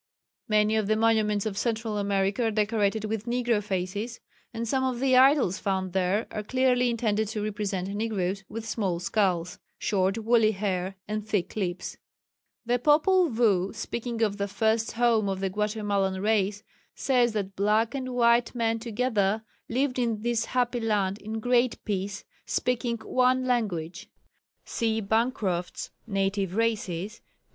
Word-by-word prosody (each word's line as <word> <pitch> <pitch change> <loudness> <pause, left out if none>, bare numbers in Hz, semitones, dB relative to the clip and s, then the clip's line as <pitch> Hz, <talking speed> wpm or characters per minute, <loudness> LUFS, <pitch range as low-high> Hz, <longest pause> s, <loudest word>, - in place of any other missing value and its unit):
Many 215 0 +3
of 215 -2 0
the 215 - +3
monuments 215 -2 +2
of 210 -2 -2
Central 225 -2 -1
America 200 +2 0
are - - +2
decorated 215 0 0
with 220 +1 -3
negro 240 -3 +1
faces, 200 +4 -3 0.3
and 230 -1 -4
some 260 +3 +1
of 255 -2 -1
the 260 0 +3
idols 260 - +5
found 190 -2 -2
there 190 +4 +1
are 210 - -3
clearly 250 +2 +2
intended 220 -2 0
to 210 0 -3
represent 200 -3 -2
negros, 200 -2 -2
with 225 +1 -6
small 195 -6 -1
skulls, 180 -2 0 0.2
short 190 0 0
woolly 225 -1 +3
hair 190 -1 -2
and 215 0 -3
thick 205 -5 -1
lips. 185 -4 -3 0.7
The 245 +1 +1
Popul 325 +6 +4
Vuh, 210 -4 +2
speaking 230 +1 -3
of 205 -2 0
the 200 -1 -1
first 220 +3 0
home 230 -3 +2
of 190 -1 -2
the 195 -1 -1
Guatemalan 205 -2 -1
race, 205 0 +1 0.3
says 245 -4 +2
that 200 -2 -3
"black 215 +4 +2
and 255 -2 -4
white 235 0 +3
men 230 -1 0
together" 220 -2 0 0.3
lived 255 +1 0
in 230 -3 -1
this 235 -1 0
happy 245 -1 0
land 205 -3 0
"in 220 +1 -5
great 245 +1 +2
peace," 195 -1 -3 0.2
speaking 240 -1 0
"one 255 0 +2
language." 200 -6 -2 0.6
(See 225 -1 -1
Bancroft's 210 -4 -1 0.2
Native 195 -2 -1
Races, 215 -3 -1
p. - - -43
215 Hz, 150 wpm, -27 LUFS, 195-235 Hz, 0.7 s, idols